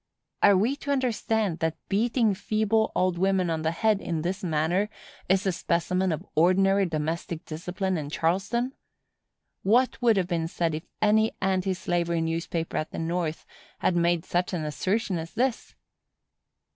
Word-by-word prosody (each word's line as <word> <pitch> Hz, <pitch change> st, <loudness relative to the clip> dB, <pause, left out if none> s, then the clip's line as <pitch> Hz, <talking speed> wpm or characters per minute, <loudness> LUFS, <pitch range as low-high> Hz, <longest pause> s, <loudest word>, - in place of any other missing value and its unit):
Are 200 Hz, -2 st, +6 dB
we 230 Hz, +9 st, +2 dB
to 285 Hz, -, -8 dB
understand 220 Hz, -8 st, 0 dB
that 160 Hz, 0 st, -1 dB
beating 225 Hz, +1 st, +2 dB
feeble 215 Hz, +2 st, +1 dB
old 180 Hz, -1 st, +1 dB
women 190 Hz, -2 st, +2 dB
on 160 Hz, -1 st, -1 dB
the 160 Hz, -, +1 dB
head, 210 Hz, +4 st, +1 dB
in 165 Hz, -2 st, -2 dB
this 190 Hz, +3 st, -3 dB
manner, 175 Hz, +5 st, +1 dB, 0.4 s
is 190 Hz, +1 st, +3 dB
a 190 Hz, -, +2 dB
specimen 180 Hz, +2 st, 0 dB
of 155 Hz, -, -3 dB
ordinary 195 Hz, +4 st, +4 dB
domestic 160 Hz, +1 st, -3 dB
discipline 180 Hz, +4 st, -3 dB
in 145 Hz, -1 st, -5 dB
Charleston? 195 Hz, -, 0 dB, 0.9 s
What 245 Hz, +6 st, +2 dB
would 230 Hz, -4 st, +4 dB
have 185 Hz, -2 st, +1 dB
been 165 Hz, -2 st, -1 dB
said 165 Hz, -1 st, -1 dB
if 155 Hz, +1 st, -5 dB, 0.2 s
any 220 Hz, +1 st, +3 dB
anti 190 Hz, 0 st, 0 dB
slavery 170 Hz, -2 st, -1 dB
newspaper 165 Hz, 0 st, -2 dB
at 155 Hz, -, -2 dB
the -, -, -8 dB
North 165 Hz, -1 st, -2 dB, 0.3 s
had 180 Hz, -, +1 dB
made 170 Hz, 0 st, +2 dB
such 180 Hz, +2 st, -1 dB
an 160 Hz, -3 st, -2 dB
assertion 185 Hz, -, -1 dB
as 165 Hz, +5 st, -8 dB
this? 250 Hz, +1 st, -1 dB
180 Hz, 160 wpm, -27 LUFS, 165-205 Hz, 0.9 s, Are